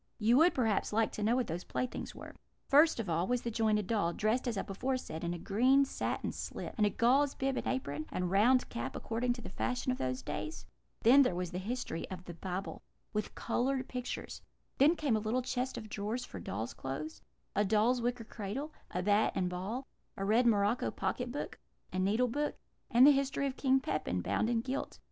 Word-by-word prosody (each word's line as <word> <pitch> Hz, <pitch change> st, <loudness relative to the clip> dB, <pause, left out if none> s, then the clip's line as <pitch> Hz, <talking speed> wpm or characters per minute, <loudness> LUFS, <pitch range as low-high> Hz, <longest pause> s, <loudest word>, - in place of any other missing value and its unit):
You 230 Hz, +2 st, +4 dB
would, 335 Hz, +4 st, +5 dB
perhaps, 225 Hz, -6 st, +1 dB
like 220 Hz, +1 st, +2 dB
to -, -, -6 dB
know 220 Hz, +3 st, +3 dB
what 255 Hz, -1 st, +1 dB
these 170 Hz, 0 st, -4 dB
playthings 255 Hz, -, -4 dB
were: -, -, -10 dB, 0.3 s
First 300 Hz, 0 st, +5 dB
of 225 Hz, -, -2 dB
all 170 Hz, +2 st, 0 dB
was 245 Hz, -1 st, 0 dB
the 235 Hz, -, -2 dB
jointed 215 Hz, -2 st, +2 dB
doll, 195 Hz, -5 st, +1 dB
dressed, 220 Hz, +7 st, 0 dB
as 230 Hz, -4 st, -1 dB
I -, -, -1 dB
before 255 Hz, +7 st, -2 dB
said, 160 Hz, -9 st, -7 dB
in 170 Hz, -, -1 dB
a 175 Hz, -, -3 dB
green 255 Hz, +10 st, +3 dB
satin -, -, -2 dB
slip, -, -, -6 dB
and 210 Hz, -3 st, +3 dB
a -, -, +2 dB
gauze 265 Hz, +5 st, +3 dB
bib 270 Hz, 0 st, -1 dB
and -, -, -3 dB
apron, 155 Hz, -, -2 dB
and 180 Hz, -1 st, -1 dB
round 245 Hz, +6 st, +4 dB
cap, 120 Hz, +3 st, -4 dB
according 240 Hz, +2 st, -1 dB
to 240 Hz, -1 st, -10 dB
the -, -, -7 dB
fashion 250 Hz, +5 st, -1 dB
of 255 Hz, -, -3 dB
those 130 Hz, 0 st, -2 dB
days; 320 Hz, -, -5 dB, 0.4 s
then 260 Hz, +5 st, +8 dB
there 250 Hz, -10 st, +2 dB
was 180 Hz, -1 st, -3 dB
the 180 Hz, -, -3 dB
History 205 Hz, -5 st, -4 dB
of 185 Hz, -1 st, -7 dB
the 175 Hz, -, -7 dB
Bible, 185 Hz, +3 st, -5 dB, 0.3 s
with 210 Hz, -1 st, -2 dB
coloured 260 Hz, +2 st, 0 dB
pictures; 250 Hz, -1 st, -5 dB, 0.4 s
then 300 Hz, +5 st, +6 dB
came 295 Hz, -8 st, +1 dB
a -, -, +2 dB
little 225 Hz, +4 st, -1 dB
chest 255 Hz, +1 st, -2 dB
of 215 Hz, -, -6 dB
drawers, 215 Hz, +4 st, -3 dB
for 95 Hz, -, -8 dB
dolls' 110 Hz, +6 st, -4 dB
clothes; 140 Hz, +4 st, -5 dB, 0.3 s
a 205 Hz, -, +3 dB
doll's 220 Hz, +5 st, +3 dB
wicker 245 Hz, 0 st, -1 dB
cradle; 235 Hz, +8 st, -5 dB, 0.2 s
a 180 Hz, -, -2 dB
bat 205 Hz, +2 st, +3 dB
and 180 Hz, -2 st, 0 dB
ball; 205 Hz, +9 st, -4 dB, 0.3 s
a 195 Hz, -, -2 dB
red 230 Hz, +4 st, +4 dB
morocco 210 Hz, +1 st, +2 dB
pocket 245 Hz, -1 st, -2 dB
book; 290 Hz, -, -5 dB, 0.3 s
a 185 Hz, -, -1 dB
needle 215 Hz, +7 st, +2 dB
book; 295 Hz, +5 st, -1 dB, 0.3 s
and 240 Hz, +3 st, +7 dB
the 295 Hz, -, +9 dB
History 275 Hz, 0 st, +1 dB
of 270 Hz, -1 st, -2 dB
King 265 Hz, -1 st, +3 dB
Pepin, 90 Hz, -, -2 dB
bound 220 Hz, -, +1 dB
and 230 Hz, -1 st, +1 dB
gilt. 265 Hz, +2 st, -3 dB
225 Hz, 215 wpm, -33 LUFS, 195-255 Hz, 0.4 s, the